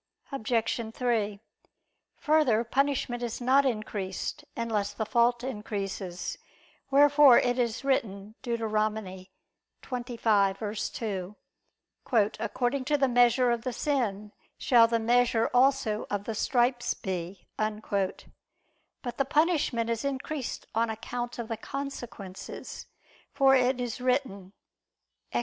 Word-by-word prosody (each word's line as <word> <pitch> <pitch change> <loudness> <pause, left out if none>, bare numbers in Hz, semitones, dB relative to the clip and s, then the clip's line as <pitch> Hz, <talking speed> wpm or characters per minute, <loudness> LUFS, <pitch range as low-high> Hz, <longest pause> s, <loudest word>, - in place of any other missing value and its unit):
Obj. 230 -2 -1
3: 220 -5 0 0.8
Further, 295 -8 +3
punishment 255 -1 0
is 235 -2 -3
not 265 +3 +4
increased, 215 0 -3
unless 220 -3 -1
the 220 - -3
fault 240 +1 +2
increases: 200 -6 -4 0.5
wherefore 285 -1 +7
it 245 0 +1
is 235 +1 -1
written 215 -6 -1
(Deut. 235 -2 -2 1.2
25:2): 210 -4 -1 1.0
"According 250 +4 -1
to 295 +1 +2
the 270 -1 +3
measure 245 0 +4
of 235 -1 0
the 255 - -3
sin 220 -7 -1 0.3
shall 235 -3 +5
the 230 0 +1
measure 235 0 +2
also 250 -4 +2
of 205 -1 -2
the 225 - -4
stripes 240 +2 +1
be." 185 -1 -5
But 210 -3 -2 0.9
the 275 - +3
punishment 290 -6 +1
is 230 -1 -2
increased 280 0 -4
on 230 +1 +1
account 240 +2 -5
of 235 -2 -4
the 225 - -3
consequences; 240 -9 -7 0.5
for 270 -1 +5
it 255 0 +2
is 245 0 -4
written 250 -7 -1 0.8
(Ex. - - 0
235 Hz, 110 wpm, -28 LUFS, 215-260 Hz, 1.2 s, wherefore